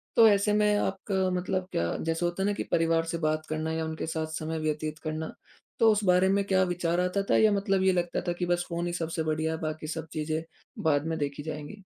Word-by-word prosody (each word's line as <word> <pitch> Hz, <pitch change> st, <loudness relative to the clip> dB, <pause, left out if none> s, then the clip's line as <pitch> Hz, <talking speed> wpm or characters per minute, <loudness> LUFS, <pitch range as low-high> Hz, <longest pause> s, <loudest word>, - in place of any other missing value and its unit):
तो 230 Hz, -1 st, +8 dB
ऐसे 205 Hz, 0 st, +3 dB
में 210 Hz, 0 st, +3 dB
आपका 190 Hz, -1 st, 0 dB
मतलब 185 Hz, 0 st, -2 dB
क्या 85 Hz, 0 st, 0 dB
जैसे 165 Hz, +2 st, -1 dB
होता 175 Hz, +2 st, -1 dB
है 200 Hz, -, +2 dB
ना 205 Hz, -, +1 dB
कि -, -, -3 dB
परिवार 165 Hz, 0 st, +3 dB
से 165 Hz, 0 st, -2 dB
बात 155 Hz, 0 st, 0 dB
करना 155 Hz, +1 st, -2 dB
या 160 Hz, 0 st, -1 dB
उनके 160 Hz, 0 st, -4 dB
साथ 160 Hz, -1 st, -2 dB
समय 160 Hz, 0 st, -3 dB
व्यतीत 155 Hz, 0 st, -2 dB
करना। 155 Hz, 0 st, -4 dB, 0.5 s
तो 225 Hz, -1 st, +6 dB
उस 210 Hz, 0 st, +1 dB
बारे 180 Hz, 0 st, +5 dB
में 200 Hz, +1 st, +2 dB
क्या 190 Hz, -1 st, +3 dB
विचार 175 Hz, -1 st, 0 dB
आता 180 Hz, +2 st, +1 dB
था? -, -, +5 dB
या 220 Hz, -1 st, +5 dB
मतलब 195 Hz, -1 st, +1 dB
ये 190 Hz, -, +5 dB
लगता 175 Hz, -1 st, -1 dB
था 175 Hz, -, +1 dB
कि 175 Hz, +1 st, -2 dB
बस 175 Hz, 0 st, 0 dB
फ़ोन 170 Hz, 0 st, -2 dB
ही 175 Hz, -, -3 dB
सबसे 165 Hz, -1 st, -2 dB
बढ़िया 155 Hz, 0 st, 0 dB
है -, -, -3 dB
बाकी 155 Hz, 0 st, -4 dB
सब 160 Hz, 0 st, -4 dB
चीज़ें 155 Hz, 0 st, -1 dB, 0.4 s
बाद 145 Hz, -2 st, +2 dB
में 165 Hz, 0 st, -1 dB
देखी 145 Hz, 0 st, -3 dB
जाएँगी। 155 Hz, +6 st, -7 dB
170 Hz, 240 wpm, -28 LUFS, 155-190 Hz, 0.5 s, तो